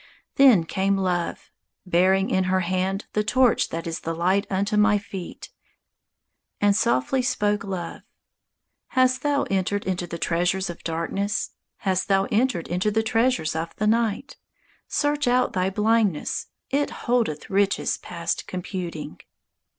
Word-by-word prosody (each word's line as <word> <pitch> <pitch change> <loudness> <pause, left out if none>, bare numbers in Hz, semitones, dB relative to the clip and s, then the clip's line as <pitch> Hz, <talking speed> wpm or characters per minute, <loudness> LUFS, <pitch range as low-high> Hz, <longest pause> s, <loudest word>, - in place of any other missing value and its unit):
Then 255 -11 +6
came 195 +4 0
Love, 180 -3 -2 0.3
bearing 190 +2 +3
in 190 0 +2
her 185 0 +1
hand 185 +3 -1
The 210 - +1
torch 250 +2 +3
that 165 0 -5
is 165 -1 -3
the 165 0 -4
light 185 +4 +1
unto 200 +2 0
my 210 0 +4
feet, 195 -3 -8 1.1
And 205 -1 +3
softly 130 - +1
spoke 210 -3 0
Love: 185 -5 -5 1.0
"Hast 255 0 +4
thou 290 -1 +1
Entered 195 +1 0
into 180 -2 -2
the 170 - -5
treasures 175 +3 0
of 170 - -13
darkness? 195 +5 -2 0.3
Hast 185 -2 0
thou 195 -1 +3
entered 215 -5 +1
into 180 +5 0
the 220 +1 +1
treasures 225 -8 +1
of 165 +1 -4
the 215 - -1
night? 230 +4 0 0.5
Search 290 -1 0
out 250 +1 +2
thy 185 0 +1
blindness. 210 -4 +1 0.2
It 285 +1 +1 0.2
holdeth 235 -13 0
Riches 200 0 +1
past 170 -1 -4
computing." 175 -4 -5
195 Hz, 140 wpm, -24 LUFS, 180-220 Hz, 1.1 s, Then